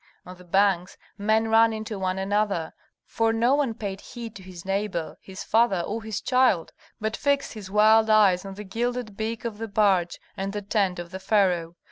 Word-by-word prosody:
On 180 Hz, -, -10 dB
the 180 Hz, -, -15 dB
banks 185 Hz, 0 st, +1 dB, 0.2 s
men 220 Hz, +2 st, +1 dB
ran 225 Hz, 0 st, +5 dB
into 215 Hz, -2 st, -5 dB
one 185 Hz, 0 st, -1 dB
another, 195 Hz, -4 st, -1 dB, 0.3 s
for 225 Hz, 0 st, 0 dB
no 235 Hz, +3 st, +2 dB
one 280 Hz, -6 st, +1 dB
paid 200 Hz, -3 st, -5 dB
heed 230 Hz, -3 st, -9 dB
to 195 Hz, -, -10 dB
his 185 Hz, -2 st, -11 dB
neighbor, 195 Hz, -4 st, -2 dB
his 190 Hz, 0 st, -9 dB
father, 220 Hz, -5 st, +2 dB
or 215 Hz, +6 st, -4 dB
his 220 Hz, -2 st, -4 dB
child, 250 Hz, -10 st, +2 dB, 0.3 s
but 220 Hz, 0 st, -2 dB
fixed 280 Hz, -1 st, 0 dB
his 210 Hz, -4 st, -9 dB
wild 220 Hz, +2 st, +5 dB
eyes 205 Hz, -4 st, +5 dB
on 195 Hz, -1 st, -8 dB
the 210 Hz, -, -7 dB
gilded 235 Hz, +2 st, -3 dB
beak 225 Hz, +2 st, -4 dB
of 220 Hz, -2 st, -4 dB
the 225 Hz, -, -4 dB
barge 195 Hz, -4 st, +2 dB, 0.2 s
and 195 Hz, +1 st, -4 dB
the 205 Hz, -, -3 dB
tent 195 Hz, -3 st, 0 dB
of 175 Hz, 0 st, -7 dB
the 190 Hz, -, -6 dB
pharaoh. 185 Hz, -4 st, +1 dB
205 Hz, 195 wpm, -25 LUFS, 190-225 Hz, 0.3 s, ran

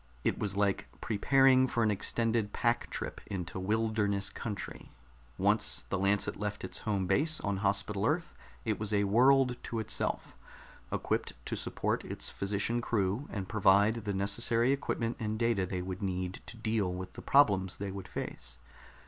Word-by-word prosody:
It -, -, 0 dB
was 100 Hz, -2 st, -1 dB
like 100 Hz, -1 st, +1 dB
preparing 130 Hz, +4 st, +4 dB
for 120 Hz, -2 st, 0 dB
an 110 Hz, -, +3 dB
extended 110 Hz, +1 st, 0 dB
pack -, -, +1 dB
trip -, -, -5 dB
into 90 Hz, -2 st, -4 dB
wilderness 105 Hz, -1 st, 0 dB
country; 105 Hz, -3 st, -6 dB, 0.5 s
once -, -, +1 dB
the -, -, -1 dB
Lancet 100 Hz, +1 st, +1 dB
left 105 Hz, 0 st, -3 dB
its -, -, -3 dB
home 100 Hz, -4 st, -1 dB
base 155 Hz, -, +2 dB
on 100 Hz, -2 st, -1 dB
Hospital 100 Hz, +1 st, 0 dB
Earth 160 Hz, +3 st, -1 dB, 0.3 s
it 110 Hz, -2 st, 0 dB
was 105 Hz, -1 st, -2 dB
a 100 Hz, -1 st, +3 dB
world 125 Hz, +4 st, +4 dB
to 115 Hz, -, -4 dB
itself, 110 Hz, -, -2 dB, 0.6 s
equipped -, -, -1 dB
to -, -, -2 dB
support -, -, -1 dB
its -, -, -4 dB
physician 100 Hz, +4 st, 0 dB
crew 105 Hz, +3 st, 0 dB
and 95 Hz, -3 st, -4 dB
provide 105 Hz, +2 st, +3 dB
the 100 Hz, -, -1 dB
necessary 115 Hz, +5 st, +2 dB
equipment 120 Hz, -4 st, -1 dB
and 110 Hz, -1 st, -2 dB
data 115 Hz, -5 st, +1 dB
they 90 Hz, 0 st, -3 dB
would 95 Hz, 0 st, -5 dB
need 90 Hz, -1 st, -3 dB
to 115 Hz, -, -9 dB
deal 110 Hz, -4 st, 0 dB
with 90 Hz, 0 st, -6 dB
the -, -, -9 dB
problems 100 Hz, -10 st, +3 dB
they 100 Hz, -1 st, -4 dB
would 95 Hz, -1 st, -7 dB
face. 65 Hz, -1 st, -6 dB
105 Hz, 165 wpm, -31 LUFS, 95-115 Hz, 0.6 s, preparing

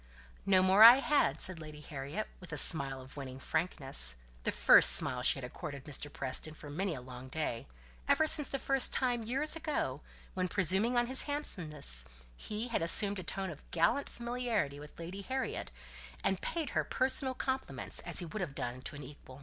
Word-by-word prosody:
"No 190 Hz, -1 st, +4 dB
more 190 Hz, +3 st, +3 dB
I 230 Hz, +2 st, +11 dB
had," 275 Hz, -, 0 dB
said 185 Hz, -3 st, 0 dB
Lady 155 Hz, -1 st, -11 dB
Harriet, 145 Hz, +7 st, -7 dB
with 180 Hz, -, -13 dB
a -, -, -4 dB
smile 135 Hz, -4 st, +3 dB
of 130 Hz, +3 st, -15 dB
winning 130 Hz, -2 st, -8 dB
frankness: 135 Hz, -, +5 dB, 0.3 s
the -, -, 0 dB
first -, -, +6 dB
smile 125 Hz, -, +3 dB
she -, -, +1 dB
had 135 Hz, -, -9 dB
accorded 140 Hz, +2 st, -8 dB
to 150 Hz, -, -11 dB
Mr. 145 Hz, +1 st, -3 dB
Preston 140 Hz, +4 st, -4 dB
for 145 Hz, -1 st, -11 dB
many 180 Hz, +3 st, -3 dB
a 125 Hz, -, -9 dB
long 125 Hz, 0 st, -11 dB
day; 130 Hz, -, -5 dB, 0.4 s
ever 315 Hz, -, +2 dB
since 300 Hz, -2 st, +4 dB
the 275 Hz, -, -3 dB, 0.3 s
time, 245 Hz, -2 st, -1 dB
years 270 Hz, +8 st, -1 dB
ago, 300 Hz, -, -4 dB, 0.3 s
when, 185 Hz, -1 st, -2 dB
presuming 200 Hz, +6 st, 0 dB
on 240 Hz, -, +2 dB
his 260 Hz, +2 st, +2 dB
handsomeness, 155 Hz, -, 0 dB, 0.3 s
he 215 Hz, -, -6 dB
had 235 Hz, -, -2 dB
assumed 200 Hz, +4 st, +6 dB
a -, -, -7 dB
tone 190 Hz, -1 st, -5 dB
of 150 Hz, -, -15 dB
gallant 170 Hz, +12 st, 0 dB
familiarity 235 Hz, -, -3 dB
with 150 Hz, +1 st, -14 dB
Lady 175 Hz, +4 st, -8 dB
Harriet, 260 Hz, -, -5 dB, 0.5 s
and 195 Hz, -1 st, -1 dB
paid 320 Hz, -5 st, -4 dB
her -, -, -1 dB
personal 260 Hz, 0 st, -1 dB
compliments 265 Hz, 0 st, -4 dB
as -, -, -3 dB
he 175 Hz, -, +3 dB
would 180 Hz, +6 st, -7 dB
have 155 Hz, -7 st, -6 dB
done 125 Hz, 0 st, -6 dB
to 140 Hz, -, -8 dB
an 145 Hz, -, -9 dB
equal. 135 Hz, -1 st, -14 dB
175 Hz, 190 wpm, -31 LUFS, -, 0.5 s, I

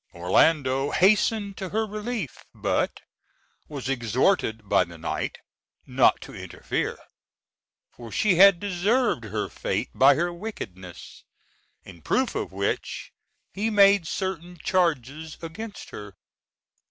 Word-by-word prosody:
Orlando 135 Hz, -, +2 dB
hastened 200 Hz, +2 st, +2 dB
to 190 Hz, -, -5 dB
her 220 Hz, +3 st, 0 dB
relief, 215 Hz, -, -5 dB
but -, -, -1 dB, 0.7 s
was 140 Hz, -4 st, -6 dB
exhorted 120 Hz, -, 0 dB
by -, -, +4 dB
the 85 Hz, -1 st, -12 dB
knight 80 Hz, -, -3 dB, 0.5 s
not -, -, +3 dB
to -, -, -10 dB
interfere, -, -, -4 dB, 0.9 s
for 115 Hz, -2 st, -11 dB
she 210 Hz, -3 st, +2 dB
had 190 Hz, 0 st, +7 dB
deserved 200 Hz, -, 0 dB
her 105 Hz, -1 st, -3 dB
fate 100 Hz, +4 st, -3 dB
by 135 Hz, +1 st, +6 dB
her 175 Hz, +4 st, -1 dB
wickedness. 95 Hz, -, -9 dB, 0.6 s
In 85 Hz, -4 st, -13 dB
proof -, -, 0 dB
of -, -, -3 dB
which -, -, -3 dB, 0.4 s
he 210 Hz, +3 st, -1 dB
made 200 Hz, -4 st, +5 dB
certain 180 Hz, -1 st, -4 dB
charges 160 Hz, -3 st, -1 dB
against 200 Hz, +6 st, -8 dB
her. 105 Hz, -2 st, -9 dB
165 Hz, 115 wpm, -25 LUFS, -, 0.9 s, had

